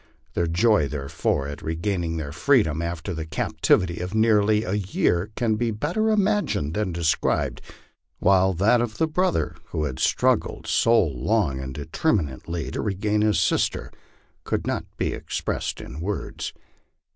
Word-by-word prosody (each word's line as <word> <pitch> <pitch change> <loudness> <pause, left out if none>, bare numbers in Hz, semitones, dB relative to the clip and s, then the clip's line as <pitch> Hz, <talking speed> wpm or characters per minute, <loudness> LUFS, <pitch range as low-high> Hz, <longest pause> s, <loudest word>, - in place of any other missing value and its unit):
Their 85 - 0
joy 85 -2 +3
therefore 70 0 -2
at 70 0 -7
regaining 85 0 -2
their 75 -3 -4
freedom 80 - +2
after 85 +2 -4
a 80 -2 -3
cap 80 - -4
tivity 85 -1 +3
of 90 +4 -4
nearly 110 -1 +3
a 95 - -3
year 95 -2 0
can 110 -3 +1
be 120 +1 0
better 165 - 0
imagined 205 - +1
than 105 -1 -1
described; 85 -2 0 0.6
while 95 0 +3
that 110 +7 +4
of 110 -2 -3
the - - +3
brother 155 - 0
who 75 - -3
had 65 -4 -3
struggled - - +1
so 115 0 +4
long 75 - 0
and 65 0 -5
determinedly 80 - -2
to - - -3
regain 105 +1 0
his 105 0 +3
sister - - 0 0.5
could - - -2
not - - -2
be - - -1
expressed - - -3
in 65 - -8
words. 100 +5 -4
95 Hz, 150 wpm, -24 LUFS, 80-110 Hz, 0.6 s, that